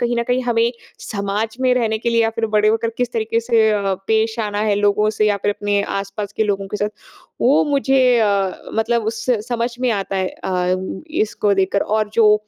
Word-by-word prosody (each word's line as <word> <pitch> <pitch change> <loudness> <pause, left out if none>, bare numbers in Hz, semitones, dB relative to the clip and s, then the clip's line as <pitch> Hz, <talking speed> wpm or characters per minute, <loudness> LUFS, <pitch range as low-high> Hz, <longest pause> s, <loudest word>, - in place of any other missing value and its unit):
कहीं 240 0 0
न - - +2
कहीं 255 +1 +1
हमें 235 -1 +2 0.3
समाज 210 +2 -3
में 255 -1 +3
रहने 220 -3 0
के 235 - -2
लिए 230 0 +3
या 225 - +1
फिर 225 0 -2
बड़े 210 0 +4
होकर 225 +1 +1
किस 245 -1 -1
तरीके 225 0 0
से 225 -1 +3
अ, 200 -2 0
पेश 220 +1 +1
आना 205 -1 -2
है 210 -1 +2
लोगों 205 +1 +2
से 215 0 +1
या 205 - +2
फिर 205 - +2
अपने 205 -1 +1 0.2
आस-पास 200 +1 -5
के 220 - +2
लोगों 200 -1 -1
के 210 - -3
साथ 205 +1 -1 0.5
वो 265 +4 +4
मुझे 270 -2 +2 0.2
अ, 200 -3 +2 0.2
मतलब 225 0 +1
उससे 225 0 -1
समझ 235 0 -2
में 250 -2 +1
आता 195 -2 -2
है 185 -1 0
अ, 180 0 -1 0.5
इसको 205 -1 0
देख 195 -1 +1
कर। 200 - +2
और 215 0 0
जो 215 -2 +6
220 Hz, 215 wpm, -19 LUFS, 205-230 Hz, 0.5 s, जो